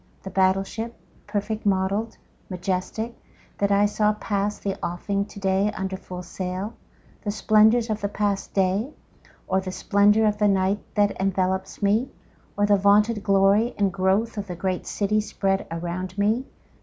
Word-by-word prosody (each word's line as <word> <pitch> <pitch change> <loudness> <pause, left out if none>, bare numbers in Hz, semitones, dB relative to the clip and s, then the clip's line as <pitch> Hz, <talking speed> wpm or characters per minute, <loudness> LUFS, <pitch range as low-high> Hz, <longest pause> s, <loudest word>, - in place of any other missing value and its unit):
The 190 - -7
battle 190 +1 +3
ship, 225 +4 -6 0.3
perfect 210 +1 -2
model'd, 200 +3 0 0.3
majestic, 185 +5 -3 0.5
that 200 0 +1
I 200 +1 +4
saw 210 +1 +2
pass 205 -1 -2
the 195 -1 -3
offing 200 +3 -1
to 205 - -11
day 195 +1 +1
under 190 0 -3
full 180 -1 -8
sail? 185 +4 -4 0.5
The 210 - -3
splendors 220 +2 +4
of 215 -1 -2
the 200 - 0
past 205 -1 -2
day? 195 +8 +1 0.5
Or 190 +1 +1
the 185 -1 -5
splendor 205 +3 +3
of 210 -1 +1
the 210 - +4
night 195 +1 +2 0.2
that 205 -1 +2
envelopes 190 0 -1
me? 215 +6 +2 0.5
Or 205 - +3
the 205 0 +4
vaunted 210 +2 +3
glory 200 +4 +3
and 195 -2 +1
growth 195 +4 +1
of 200 - -5
the 180 - -5
great 185 +1 -2
city 210 +1 +1
spread 195 -2 -1
around 175 +3 -4
me? 215 +6 +1
200 Hz, 160 wpm, -24 LUFS, 190-210 Hz, 0.5 s, I